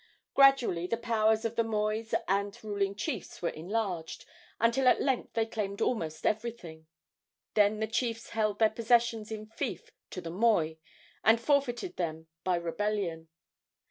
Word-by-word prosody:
Gradually 265 -11 +5
the 230 - -1
powers 220 -1 +2
of 230 0 -2
the 230 - +2
mois 220 0 -1
and 200 +1 0
ruling 200 -2 -1
chiefs 210 - -4
were 170 - 0
enlarged, 180 -1 -3 0.3
until 235 +3 +3
at 250 - +6
length 265 -3 0
they 225 -1 +1
claimed 205 -3 -4
almost 160 -10 -1
everything. 210 -8 -3 0.7
Then 210 0 +3
the 220 - +1
chiefs 230 0 -2
held 215 -2 0
their 220 0 +4
possessions 230 -1 +2
in 215 -1 -5
fief 220 - -5 0.2
to - - -6
the 165 -2 -6
moi, 185 -5 +2 0.5
and 225 +1 +5
forfeited 280 +5 0
them 160 -2 -3 0.2
by 185 -1 +2
rebellion. 170 -1 -2
215 Hz, 145 wpm, -30 LUFS, 190-230 Hz, 0.7 s, at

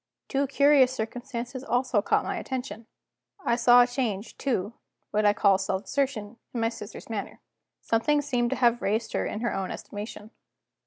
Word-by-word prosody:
Two 275 +1 +1
curious 280 -1 +5
circumstances 245 +2 -5
also 245 -4 +1
caught - - +2
my - - -2
attention. 250 -4 -5 0.6
I 235 - +3
saw 245 0 +7
a - - 0
change 235 -5 -3
to, 230 -6 -1 0.4
what 210 0 +1
I 205 - +5
call 195 -2 +4
self 190 0 -2
assertion, 250 -6 -2 0.2
in - - 0
my 225 - +2
sister's 215 -2 -9
manner; 215 -3 -5 0.4
something 290 +6 +1
seemed 245 -4 0
to 265 - 0
have 240 -2 +3
raised 220 +3 -1
her - - 0
in 215 - -4
her 240 - 0
own 195 -1 -2
estimation. 210 +1 -7
235 Hz, 170 wpm, -27 LUFS, 210-260 Hz, 0.6 s, saw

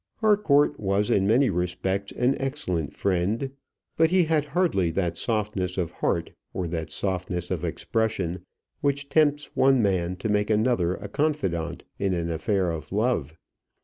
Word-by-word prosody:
Harcourt 205 -10 +3
was 100 +1 +1
in 95 0 +3
many 125 +4 +4
respects 90 +2 -2
an 125 +3 +2
excellent 110 - -2
friend; 100 +8 -1 0.5
but 160 0 +5
he 185 0 +4
had 155 -2 +1
hardly 150 - +1
that 85 0 -1
softness 100 -2 -1
of 90 -3 -1
heart, - - -1 0.2
or 90 - -1
that 80 -1 -4
softness 90 +1 -2
of 90 -3 -2
expression 90 +1 -1 0.4
which 140 -1 -1
tempts 150 -1 +2
one 135 -1 +4
man 90 -4 +1
to 95 - -4
make 105 0 +1
another 105 -5 +2
a 105 - -7
confidant 100 - -1 0.2
in 95 -2 +1
an 85 -1 -2
affair 90 +2 0
of 80 -1 -6
love. 100 - 0
100 Hz, 150 wpm, -26 LUFS, 90-135 Hz, 0.5 s, but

